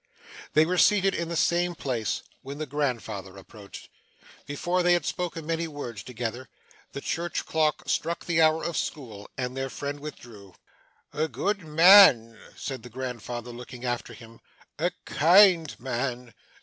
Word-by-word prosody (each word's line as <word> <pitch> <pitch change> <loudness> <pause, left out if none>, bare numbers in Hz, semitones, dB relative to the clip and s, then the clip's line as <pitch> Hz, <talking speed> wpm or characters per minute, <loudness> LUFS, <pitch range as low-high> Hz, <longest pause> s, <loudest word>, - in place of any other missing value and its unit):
They 155 +1 +5
were 180 +2 -1
yet - - +6
seated 195 -2 +4
in 170 -1 -3
the 170 - -3
same 175 +1 +1
place, 125 -8 -3 0.2
when 140 +1 -8
the 155 - -4
grandfather 120 -9 -3
approached. 100 +1 -12 0.6
Before 175 +6 -1
they 175 0 +4
had 175 -4 +1
spoken 170 -3 -4
many 165 +1 -2
words 125 -9 -7
together, 120 +2 -6 0.4
the 140 - -6
church 170 +3 -3
clock 155 -1 0
struck 170 +1 -2
the 170 -2 +2
hour 160 0 +3
of 170 - -3
school, 110 -9 -5
and 125 0 -3
their 135 0 -3
friend 145 +2 -5
withdrew. 115 -10 -11 0.6
'A 155 +2 0
good 200 +4 -2
man,' 155 - +7 0.2
said 135 -2 -6
the 125 - -11
grandfather, 120 -1 -6
looking 125 +1 -9
after 120 -1 -3
him; 115 -1 -14 0.4
'a - - +2 0.2
kind 170 0 +5
man. 125 -1 -4
140 Hz, 155 wpm, -26 LUFS, 120-165 Hz, 0.6 s, man